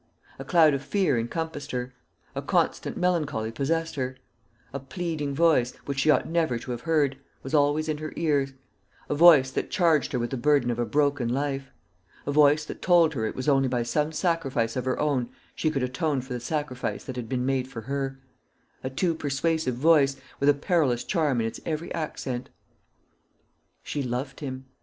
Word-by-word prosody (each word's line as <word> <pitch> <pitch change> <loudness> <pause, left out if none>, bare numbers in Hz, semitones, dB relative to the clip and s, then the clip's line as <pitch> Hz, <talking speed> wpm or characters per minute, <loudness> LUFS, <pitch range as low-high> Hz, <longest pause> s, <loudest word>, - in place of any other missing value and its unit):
A - - -5
cloud 160 -4 +5
of 140 - -1
fear 185 -3 +1
encompassed 160 +5 -4
her; 125 0 -4 0.4
a - - -3
constant - - 0
melancholy 155 -11 0
possessed 165 +7 -1
her; 130 -1 -3 0.6
a 140 - -3
pleading 150 0 -4
voice, 150 -6 +3
which 140 -1 -3
she 155 - +2
ought 150 - +4
never 160 -7 +1
to 125 - -7
have 120 -1 -4
heard, 145 -5 +1 0.2
was 135 - -7
always 150 +1 +3
in 155 -1 -2
her 155 0 -5
ears 145 -4 +1 0.6
a - - +1
voice 145 -4 +7
that - - -2
charged 160 -5 +2
her - - +1
with 120 0 -2
the 135 - -2
burden 135 -1 +3
of 120 - -3
a 120 - 0
broken 140 -4 +1
life 135 +1 -2 0.6
a 145 - -1
voice 150 +1 +4
that - - -8
told 170 -3 +4
her 110 -5 -1
it - - -5
was 130 - -4
only 135 -2 +4
by 125 -2 0
some 150 +6 0
sacrifice 150 -9 0
of 130 -1 -2
her 130 - 0
own 135 -5 0 0.2
she 155 - 0
could 140 -4 -1
atone 130 +3 0
for 130 0 -6
the 125 - -3
sacrifice 145 -1 -3
that 130 - -7
had 120 -3 -5
been 125 -1 -1
made 130 -1 0
for 125 -4 -7
her 135 +2 -3 0.7
a 130 - -2
too 165 +6 0
persuasive 155 -2 -1
voice, 140 0 +4 0.2
with 140 - +3
a - - +7
perilous 145 -6 +1
charm 150 - +1
in - - -1
its 115 - -4
every 160 +1 -3
accent. 130 -6 -4 1.3
She 145 - -3
loved 130 +1 -3
him. 130 -2 -6
140 Hz, 190 wpm, -26 LUFS, 130-155 Hz, 1.3 s, voice